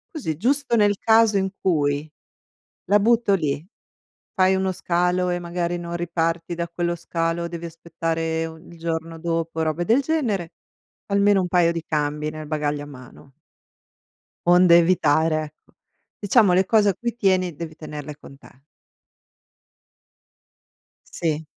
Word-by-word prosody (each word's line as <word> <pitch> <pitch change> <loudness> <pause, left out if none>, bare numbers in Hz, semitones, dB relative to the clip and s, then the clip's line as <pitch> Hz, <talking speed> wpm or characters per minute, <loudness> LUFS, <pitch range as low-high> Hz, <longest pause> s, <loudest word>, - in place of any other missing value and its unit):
Così, 160 - -3
giusto 255 - +1
nel 205 -2 +3
caso 225 0 +4
in 190 -1 +1
cui 145 -3 0 0.8
la 205 +3 +4
butto 230 0 +3
lì, 155 -3 -1 0.7
fai 190 0 +3
uno 190 0 0
scalo 180 0 0
e 175 - 0
magari 175 0 -3
non 170 0 -6
riparti 170 0 -2
da 170 0 -3
quello 170 0 -2
scalo, 170 0 -2
devi 170 0 -7
aspettare 165 0 -3
u 160 0 -10
il 170 +1 -15
giorno 165 0 -4
dopo, 165 -1 -2
robe 160 +2 -1
del 235 +8 +3
genere, 235 - -1 0.5
almeno 200 -1 +3
un 180 - -2
paio 175 -2 +3
di 165 -1 -4
cambi 150 -1 -2
nel 155 0 -8
bagaglio 150 -1 -2
a - - -8
mano. 135 -1 -14 1.1
Onde 175 -1 +7
evitare, 160 -2 +2
ecco, - - -32 0.5
diciamo 205 -2 +4
le 190 +1 +3
cose 210 -2 +4
a - - +1
cui 235 +4 -4
tieni, 185 -6 +1
devi 160 0 -7
tenerle 150 -1 -8
con 140 -1 -15
te. 135 -1 -19 2.5
Sì. 160 -2 -2
170 Hz, 140 wpm, -23 LUFS, 160-190 Hz, 2.5 s, Onde